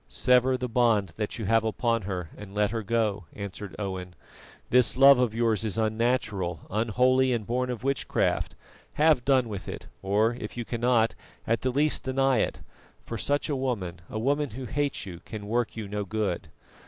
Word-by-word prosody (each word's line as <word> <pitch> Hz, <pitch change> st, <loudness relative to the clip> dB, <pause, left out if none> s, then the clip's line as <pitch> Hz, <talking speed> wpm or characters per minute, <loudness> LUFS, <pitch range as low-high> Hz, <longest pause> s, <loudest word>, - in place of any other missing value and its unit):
"Sever 125 Hz, +1 st, +3 dB
the 125 Hz, 0 st, -3 dB
bond 115 Hz, -5 st, +2 dB
that 105 Hz, -2 st, -2 dB
you 110 Hz, -, -4 dB
have 115 Hz, +2 st, +3 dB
upon 115 Hz, +1 st, 0 dB
her 90 Hz, -4 st, -4 dB
and 100 Hz, -1 st, -11 dB
let 105 Hz, 0 st, +2 dB
her 115 Hz, -1 st, -2 dB
go," 105 Hz, -3 st, 0 dB
answered 100 Hz, -1 st, -7 dB
Owen. 95 Hz, -3 st, -5 dB, 0.6 s
"This 125 Hz, 0 st, +4 dB
love 135 Hz, -1 st, +8 dB
of 120 Hz, -3 st, +1 dB
yours 115 Hz, -2 st, +1 dB
is 110 Hz, -1 st, -2 dB
unnatural, 110 Hz, -, 0 dB
unholy 125 Hz, +5 st, +2 dB
and 115 Hz, -3 st, -2 dB
born 125 Hz, +3 st, -1 dB
of 125 Hz, -2 st, -4 dB
witchcraft; 135 Hz, 0 st, 0 dB, 0.4 s
have 150 Hz, -4 st, +4 dB
done 130 Hz, -2 st, +3 dB
with 100 Hz, -3 st, -6 dB
it, -, -, -6 dB, 0.2 s
or 105 Hz, +4 st, +2 dB
if 120 Hz, -1 st, -7 dB
you 120 Hz, -, -3 dB
cannot, 115 Hz, -1 st, +2 dB, 0.3 s
at 115 Hz, +1 st, 0 dB
the 130 Hz, -, 0 dB
least 145 Hz, +4 st, +2 dB
deny 135 Hz, 0 st, +2 dB
it, -, -, -1 dB, 0.4 s
for -, -, -5 dB
such 145 Hz, 0 st, 0 dB
a 145 Hz, -, -1 dB
woman, 100 Hz, -10 st, -3 dB
a -, -, -5 dB
woman 140 Hz, +5 st, 0 dB
who 125 Hz, +4 st, -7 dB
hates 145 Hz, -2 st, -2 dB
you, 90 Hz, -3 st, -8 dB
can 105 Hz, -2 st, -7 dB
work 120 Hz, +1 st, -1 dB
you 110 Hz, -2 st, -4 dB
no 105 Hz, +1 st, -3 dB
good. 100 Hz, -3 st, -2 dB
115 Hz, 185 wpm, -27 LUFS, 105-125 Hz, 0.6 s, love